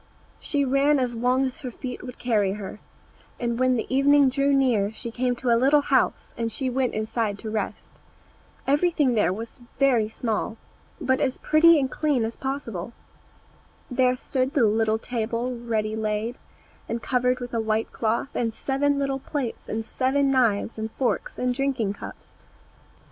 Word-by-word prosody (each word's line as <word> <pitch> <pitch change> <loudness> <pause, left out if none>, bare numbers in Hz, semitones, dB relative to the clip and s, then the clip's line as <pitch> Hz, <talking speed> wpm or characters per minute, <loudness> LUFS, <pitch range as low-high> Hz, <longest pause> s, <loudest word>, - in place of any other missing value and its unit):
She 285 -2 0
ran 275 +3 +3
as 250 -2 0
long 250 +3 +2
as 260 -1 -5
her 260 - -4
feet 250 +1 -7
would 250 -1 -8
carry 210 -5 +1
her; 210 0 -7 0.6
and 235 -1 -1
when 255 0 +3
the 230 - -1
evening 275 +1 +5
drew 275 +2 +1
near 245 -7 +2
she 230 +1 -6
came 250 +1 0
to 245 0 -1
a - - +6
little 275 +5 +4
house, 270 -2 +1
and 230 -1 -2
she 260 +3 -2
went 255 0 0
inside 215 -1 -1
to 220 +1 -6
rest. 220 - -4 0.7
Everything 290 -2 +2
there 210 -6 +2
was 225 +6 -7 0.2
very 245 -6 +3
small, 225 0 -2 0.4
but 260 -4 +1
as 260 - 0
pretty 320 +1 +5
and 265 -2 -1
clean 285 -7 +1
as 225 - -4
possible. 235 -7 -4 1.0
There 250 0 +3
stood 260 +1 -2
the 255 -6 +5
little 220 +1 +2
table 235 +2 -2
ready 220 -2 -2
laid, 220 +2 -2 0.5
and 230 - -1
covered 250 +1 +1
with 245 -1 -7
a 230 - +1
white 220 0 -1
cloth, 230 +4 -1
and 230 -2 -1
seven 285 +1 0
little 275 -1 -1
plates, 265 -4 -4
and 220 +1 -3
seven 270 +3 +1
knives 230 -4 +1
and 220 0 -3
forks, 255 -3 -1
and 250 0 0
drinking 255 -6 0
cups. - - -11
250 Hz, 170 wpm, -25 LUFS, 225-270 Hz, 1.0 s, a